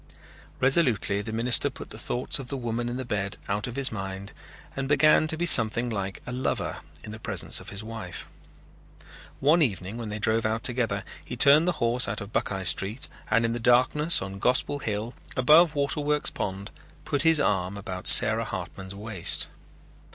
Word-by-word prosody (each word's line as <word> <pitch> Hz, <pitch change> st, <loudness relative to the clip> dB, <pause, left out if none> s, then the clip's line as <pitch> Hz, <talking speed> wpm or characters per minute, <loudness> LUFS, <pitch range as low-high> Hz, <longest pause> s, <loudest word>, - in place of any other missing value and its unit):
Resolutely 130 Hz, -8 st, +1 dB
the 110 Hz, -, -7 dB
minister 115 Hz, +2 st, +2 dB
put -, -, -11 dB
the -, -, -7 dB
thoughts 125 Hz, +3 st, -2 dB
of 135 Hz, -, -8 dB
the 135 Hz, -, -5 dB
woman 120 Hz, -1 st, -3 dB
in 120 Hz, -, -4 dB
the 130 Hz, -, -5 dB
bed 100 Hz, -4 st, -3 dB
out 105 Hz, +3 st, -2 dB
of 125 Hz, -, -7 dB
his 140 Hz, -1 st, -1 dB
mind 95 Hz, -1 st, -7 dB, 0.4 s
and 135 Hz, -1 st, -3 dB
began 155 Hz, +2 st, +4 dB
to 160 Hz, -, 0 dB
be 175 Hz, -, -1 dB
something 120 Hz, -5 st, +6 dB
like 95 Hz, -3 st, -5 dB
a -, -, -6 dB
lover 125 Hz, +1 st, -3 dB, 0.3 s
in 110 Hz, -, -9 dB
the 110 Hz, -, -9 dB
presence -, -, 0 dB
of -, -, -11 dB
his 100 Hz, +1 st, -6 dB
wife. 110 Hz, -6 st, -8 dB, 1.1 s
One 155 Hz, +5 st, +3 dB
evening 100 Hz, -, -1 dB
when 115 Hz, -2 st, -6 dB
they 105 Hz, -, -5 dB
drove 110 Hz, +2 st, 0 dB
out 110 Hz, +1 st, -2 dB
together 115 Hz, -5 st, -1 dB, 0.2 s
he 125 Hz, -, -8 dB
turned 145 Hz, +6 st, +6 dB
the 180 Hz, -, +2 dB
horse 120 Hz, -3 st, +2 dB
out -, -, -4 dB
of 100 Hz, +1 st, -9 dB
Buckeye 95 Hz, -1 st, -2 dB
Street 100 Hz, +6 st, -1 dB, 0.2 s
and 115 Hz, +1 st, +2 dB
in 115 Hz, -, -1 dB
the 120 Hz, -, -4 dB
darkness 130 Hz, -, +3 dB
on 95 Hz, +1 st, -8 dB
Gospel 125 Hz, +5 st, +1 dB
Hill, 110 Hz, 0 st, -4 dB, 0.2 s
above 155 Hz, +5 st, +5 dB
Waterworks 145 Hz, +1 st, 0 dB
Pond, 100 Hz, 0 st, -5 dB, 0.3 s
put 145 Hz, -, 0 dB
his 165 Hz, 0 st, +5 dB
arm 100 Hz, -6 st, -1 dB
about 95 Hz, -3 st, -7 dB
Sarah -, -, +6 dB
Hartman's 95 Hz, 0 st, -7 dB
waist. 105 Hz, -3 st, -3 dB
115 Hz, 185 wpm, -26 LUFS, 100-135 Hz, 1.1 s, something